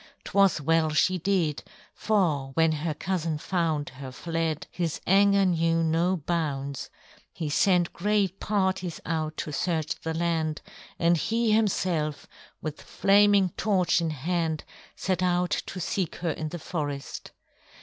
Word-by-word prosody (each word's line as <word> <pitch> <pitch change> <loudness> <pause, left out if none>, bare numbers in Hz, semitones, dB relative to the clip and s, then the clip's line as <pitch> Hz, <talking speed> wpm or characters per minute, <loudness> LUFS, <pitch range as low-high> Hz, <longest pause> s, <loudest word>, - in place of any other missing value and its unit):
'Twas 195 -5 +3
well 160 +2 +2
she 185 +4 +2
did, 165 -8 0 0.3
for 155 -11 0
when 160 0 +4
her 155 0 -2
cousin 165 -3 -2
found 160 -3 -1
her 130 0 -9
fled, 165 +2 -2
his 170 -3 -2
anger 200 +1 +5
knew 165 -2 +2
no 170 +3 +2
bounds. 140 -4 -3 0.4
He 155 -4 -4
sent 180 +1 +3
great 200 0 0
parties 190 -4 -1
out 155 -1 -2
to 150 - -4
search 160 0 -1
the 160 0 -3
land, 160 -2 -1 0.3
and 170 0 +3
he 225 +7 +1
himself, 180 -8 +1 0.4
with 155 -1 -5
flaming 200 -1 +4
torch 185 -2 +1
in 165 - 0
hand, 160 +1 -1 0.3
set 185 -1 -1
out 180 0 +1 0.2
to 185 - -6
seek 180 -1 -2
her 170 -2 -2
in 155 0 -4
the 175 - -5
forest. 145 -4 -5
170 Hz, 140 wpm, -27 LUFS, 155-185 Hz, 0.4 s, anger